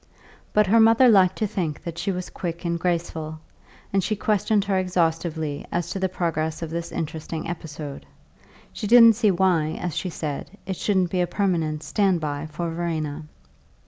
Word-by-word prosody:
But 210 0 +4
her 220 +4 +4
mother 225 +3 +6
liked 190 -5 +5
to 215 - -1
think 170 -7 -3
that 170 -1 -6
she 195 - -1
was 180 -1 -5
quick 170 0 -5
and 170 0 -1
graceful, 165 -3 -2 0.5
and 195 -1 +2
she 215 +4 0
questioned 210 0 +1
her 195 -2 +1
exhaustively 165 -4 -1
as 170 -1 -2
to 195 - -3
the 190 0 0
progress 165 -3 -2
of 160 - -5
this 170 0 -4
interesting 160 0 -4
episode; 150 -4 -7 0.7
she 210 - -4
didn't 230 0 +8
see 215 -1 +3
why, 170 -4 +2
as 175 -4 -3
she 180 +2 -2
said, 155 +4 -5
it 190 - -3
shouldn't 190 -4 +1
be 185 - +1
a 175 - +1
permanent 165 -5 -1
"stand 195 -4 +1
by" 150 0 -3
for 165 +2 -4
Verena. 160 -3 -3
175 Hz, 175 wpm, -24 LUFS, 160-195 Hz, 0.7 s, didn't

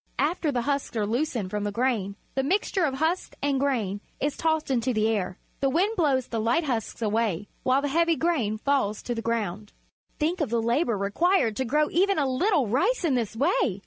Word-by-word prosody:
After 305 +2 +1
the 245 -3 -1
husks 280 -3 -2
are 210 - +1
loosened 230 -4 -1
from 210 -1 -2
the 205 - -1
grain, 220 -4 0 0.2
the 270 - +1
mixture 370 +4 +1
of 270 -3 -1
husks 320 +6 -1
and 280 -2 +1
grain 225 -8 -1 0.2
is 290 +1 -1
tossed 315 -3 0
into 250 -1 +1
the 215 0 +2
air. 195 -5 -1 0.2
The 275 - +2
wind 380 +10 +1
blows 280 - +2
the 230 - -2
light 235 +9 +2
husks 235 -4 -3
away, 210 -3 0
while 260 +2 +2
the - - +1
heavy 335 +3 +2
grain 285 -11 0
falls 220 -4 0
to 240 - -2
the 230 - -3
ground. 210 -3 -3 0.4
Think 335 +3 0
of 300 - 0
the 235 +1 +1
labour 235 0 +1
required 225 - +2
to 265 - 0
grow 300 +5 +2
even 390 +2 +2
a 290 - +2
little 290 - +2
rice 360 - +1
in 305 - +2
this 230 -4 -1
way! 255 - +1
260 Hz, 210 wpm, -26 LUFS, 220-310 Hz, 0.4 s, the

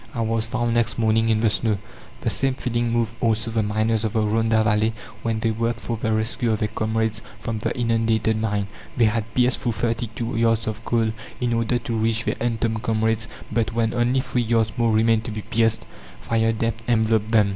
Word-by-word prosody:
I 115 - -1
was 115 0 0
found 120 0 0
next 115 -1 +1
morning 110 0 +2
in 110 -1 +2
the 115 - +4
snow." 110 -1 +1 0.4
The - - 0
same 135 -1 0
feeling 120 -2 -1
moved 115 -1 0
also 110 0 +1
the 110 0 +1
miners 110 +1 0
of 110 - -1
the 110 - +2
Rhonda 110 +1 +2
Valley, 110 +1 +2 0.3
when 115 -1 -1
they 115 - +1
worked 115 +1 -1
for 115 - -3
the 110 0 -2
rescue 110 +2 0
of 110 - +1
their 105 0 -1
comrades 110 0 -1 0.2
from 115 -1 -3
the - - -1
inundated 115 -2 +1
mine. 105 -2 0 0.3
They 120 - +5
had 110 +1 0
pierced 125 0 +3
through 120 - -1
thirty 115 +2 -1
two 115 +3 -4
yards 115 -1 +2
of 110 +1 -4
coal 115 -2 +1 0.3
in 120 -1 0
order 115 +1 +1
to 115 0 -4
reach 110 +1 +1
their - - 0
entombed 115 -2 0
comrades; 110 -1 0 0.2
but 110 -1 0
when 115 -1 +1
only 125 +2 +2
three 130 -2 -1
yards 115 -1 +1
more 115 -1 +2
remained 110 0 +3
to - - -4
be 105 -1 -5
pierced, 115 0 +1 0.3
fire 115 0 +1
damp 115 0 -2
enveloped 110 -2 +2
them. 105 -3 +4
115 Hz, 210 wpm, -23 LUFS, 110-115 Hz, 0.4 s, They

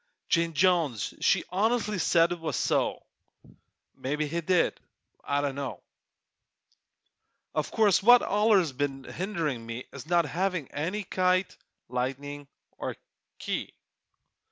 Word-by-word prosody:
Jane 170 -1 +2
Jones 165 - +2
she - - +3
honestly 210 +1 +1
said 170 0 +4
it 175 - -3
was 165 -1 -3
so! - - 0 0.9
Mebbe 150 +3 -3
he 165 +3 -2
did 180 +1 +2 0.4
I 145 0 0
dunno! 140 -8 -3 1.7
O' - - +2
course 210 -4 +2
what's 240 +4 +7
allers 205 -5 +3
been 135 0 -3
hinderin' 165 - -3
me 115 +2 -6
Is 140 +2 -9
not 170 0 +3
havin' 180 -5 -1
any 185 +8 -3
kite, 185 0 +1 0.3
lightning 135 +3 -4 0.3
er - - -3 0.4
key. - - -4
170 Hz, 115 wpm, -28 LUFS, 140-185 Hz, 1.7 s, what's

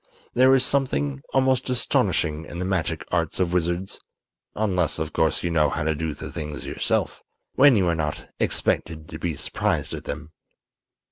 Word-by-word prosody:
There 130 +2 +6
is 130 - +4
something 70 - 0
almost 130 -1 +2
astonishing 80 -10 +1
in 85 - -8
the 90 - -2
magic 85 -3 -1
arts 85 -1 0
of 90 -2 +1
wizards; 90 +2 -1 0.6
unless, 95 -6 +1
of 80 -1 -3
course, 80 -1 +1
you 85 - 0
know 75 -2 +3
how - - -2
to 80 +1 +1
do 80 0 -3
the - - -7
things 75 -1 -5
yourself, - - -1 0.3
when 140 -1 +6
you 95 -4 +3
are 85 - +3
not 75 -2 -3
expected 80 -2 0
to 80 - -7
be 85 -2 -2
surprised - - -1
at - - -6
them. 80 +2 -6
85 Hz, 175 wpm, -24 LUFS, 80-95 Hz, 0.6 s, There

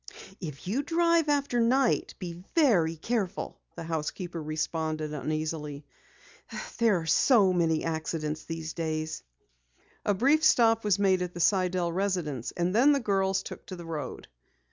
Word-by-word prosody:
"If 155 -4 -7
you 230 +9 0
drive 335 +1 +2
after 280 -4 +1
night, 250 +3 +2
be 175 -2 -7
very 195 - +4
careful," 200 +2 -3 0.2
the - - -6
housekeeper 165 +2 -4
responded 155 0 -2
uneasily. 150 -1 -3 0.9
"There 225 -5 +4
are - - -7
so 195 - +4
many 165 -3 +1
accidents 160 -1 -3
these 165 -1 -5
days." 155 -1 -3 0.8
A 205 - +1
brief 280 +9 +3
stop 225 -7 +4
was 205 -2 +2
made 190 -2 +2
at 180 -1 -4
the - - -5
Sidell 180 -1 +2
residence, 170 - -2
and 175 +1 0
then 265 +7 +5
the 280 - +2
girls 195 -4 0
took - - -8
to 185 - -6
the 175 -1 -9
road. 150 -5 -6
180 Hz, 145 wpm, -28 LUFS, 160-225 Hz, 0.9 s, then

